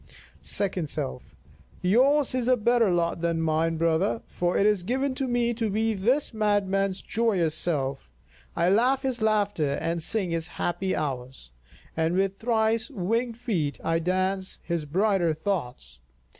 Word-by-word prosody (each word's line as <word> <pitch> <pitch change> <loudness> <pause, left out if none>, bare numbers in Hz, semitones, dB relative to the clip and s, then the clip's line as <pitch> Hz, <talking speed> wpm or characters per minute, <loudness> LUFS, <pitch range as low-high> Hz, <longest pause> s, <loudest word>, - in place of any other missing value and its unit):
Second 185 -6 -1
Self: 65 - -5 0.5
Yours 260 +9 +3
is 250 -2 -1
a 255 0 +4
better 235 -1 +3
lot 170 -1 0
than 170 -1 0
mine, 165 +1 +1
brother, 165 +7 +1
for 175 0 -1
it 200 - +3
is 210 -3 +3
given 260 +8 -1
to 265 0 -2
me 240 -1 +1
to 225 -1 -1
be 220 +2 +1
this 240 +8 0
madman's 195 -3 0
joyous 200 -9 +1
self. 140 - -1 0.5
I 170 - +2
laugh 250 +7 +3
his 260 -3 -1
laughter 205 -9 +1
and 165 +3 -2
sing 190 +1 -1
his 165 0 -2
happy 185 +2 -1
hours, 130 - -5 0.4
and 160 +2 +1
with 195 +1 0
thrice 225 -1 +1
winged 230 +1 -1
feet 185 - -2
I 165 0 +1
dance 185 +2 -1
his 170 -3 -2
brighter 180 0 +1
thoughts. 125 - -4
195 Hz, 150 wpm, -26 LUFS, 165-225 Hz, 0.5 s, a